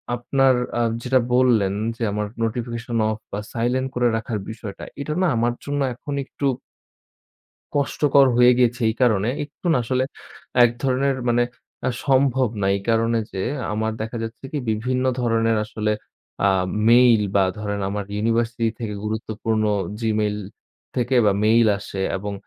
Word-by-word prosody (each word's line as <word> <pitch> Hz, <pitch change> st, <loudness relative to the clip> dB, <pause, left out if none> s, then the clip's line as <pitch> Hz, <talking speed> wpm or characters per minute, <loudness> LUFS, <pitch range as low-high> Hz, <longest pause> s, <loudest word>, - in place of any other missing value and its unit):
আপনার 135 Hz, +2 st, +2 dB, 0.2 s
আ -, -, +2 dB, 0.2 s
যেটা 130 Hz, +1 st, +3 dB
বললেন 120 Hz, -6 st, +3 dB, 0.2 s
যে 115 Hz, -, -3 dB
আমার 105 Hz, +1 st, -2 dB, 0.2 s
নোটিফিকেশন 120 Hz, +1 st, -3 dB
অফ 110 Hz, -, -2 dB
বা 100 Hz, -, -3 dB
সাইলেন্ট 125 Hz, +3 st, 0 dB
করে 125 Hz, 0 st, +2 dB
রাখার 110 Hz, -1 st, -3 dB
বিষয়টা 110 Hz, -3 st, -8 dB, 0.2 s
এটা 150 Hz, +2 st, -3 dB
না 185 Hz, -, +3 dB
আমার 120 Hz, +1 st, +1 dB
জন্য 145 Hz, 0 st, -1 dB
এখন 145 Hz, +4 st, -7 dB
একটু 140 Hz, -, -5 dB, 1.3 s
কষ্টকর 140 Hz, -1 st, +3 dB
হয়ে 125 Hz, 0 st, +7 dB
গেছে 120 Hz, 0 st, +2 dB
এই 110 Hz, -, 0 dB
কারণে 110 Hz, -3 st, +3 dB, 0.2 s
একটু 150 Hz, +5 st, -11 dB
না -, -, +3 dB
আসলে 130 Hz, +2 st, 0 dB, 0.6 s
এক 120 Hz, -, +4 dB
ধরনের 135 Hz, 0 st, +1 dB
মানে 120 Hz, 0 st, +3 dB, 0.4 s
আ -, -, +3 dB, 0.2 s
সম্ভব 130 Hz, -2 st, +3 dB
না। 95 Hz, -, +1 dB
এই 100 Hz, -, -6 dB
কারণে 115 Hz, +1 st, +2 dB
যে 95 Hz, -, -3 dB, 0.3 s
আমার 110 Hz, +1 st, -1 dB
দেখা 110 Hz, +2 st, -5 dB
যাচ্ছে 115 Hz, +3 st, -7 dB
কি 150 Hz, -, -1 dB
বিভিন্ন 125 Hz, +4 st, -1 dB, 0.2 s
ধরনের 115 Hz, -1 st, +2 dB
আসলে 105 Hz, 0 st, -2 dB, 0.5 s
আ -, -, +5 dB, 0.4 s
মেইল 120 Hz, -2 st, +6 dB
বা 100 Hz, -, +5 dB
ধরেন 105 Hz, -1 st, -3 dB
আমার 100 Hz, +1 st, -3 dB
ইউনিভার্সিটি 115 Hz, +1 st, 0 dB
থেকে 110 Hz, -3 st, -3 dB
গুরুত্বপূর্ণ 110 Hz, 0 st, -2 dB, 0.4 s
জিমেইল 105 Hz, -2 st, 0 dB, 0.6 s
থেকে 125 Hz, +1 st, +1 dB
বা 100 Hz, -, +5 dB
মেইল 115 Hz, +1 st, +5 dB
আসে 100 Hz, -1 st, -6 dB, 0.2 s
এবং 100 Hz, +2 st, -4 dB
115 Hz, 150 wpm, -22 LUFS, 110-125 Hz, 1.3 s, হয়ে